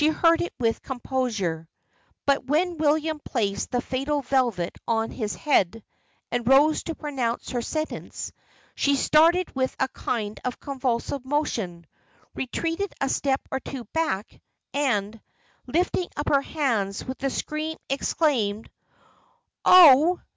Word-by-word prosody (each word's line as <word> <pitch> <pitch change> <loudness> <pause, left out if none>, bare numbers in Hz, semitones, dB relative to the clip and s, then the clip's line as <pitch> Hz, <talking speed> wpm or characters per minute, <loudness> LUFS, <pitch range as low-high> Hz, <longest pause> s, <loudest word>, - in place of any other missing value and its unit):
She 300 - +5
heard 330 +1 +3
it 350 - -3
with 230 -2 0
composure. 225 - -2 0.6
But 280 0 +2
when 335 +5 +1
William 310 0 +1
placed 200 -6 -1
the 245 -1 0
fatal 275 +3 -2
velvet 240 -9 0
on 225 -1 0
his 215 -4 -3
head, 225 - +1 0.5
and 240 -1 -2
rose 285 +4 +5
to 330 - -3
pronounce 260 -6 -3
her 245 - -1
sentence, 310 +5 -4 0.4
she 280 0 +2
started 330 +6 +3
with 260 0 -1
a 265 - +2
kind 215 -5 -3
of 250 - -3
convulsive 260 -1 -2
motion; 230 - -2 0.5
retreated 330 +9 -2
a 270 - 0
step 270 0 0
or 265 - -1
two 265 -1 -7
back, 265 -12 -2 0.3
and, 225 -7 0 0.5
lifting 355 +1 0
up 295 - -1
her 280 -1 +4
hands, 230 -11 -1
with 260 0 -6
a 275 - +2
scream 310 +3 -3
exclaimed 255 -7 0 0.9
"Oh! 340 -1 +8
270 Hz, 135 wpm, -25 LUFS, 230-305 Hz, 0.9 s, Oh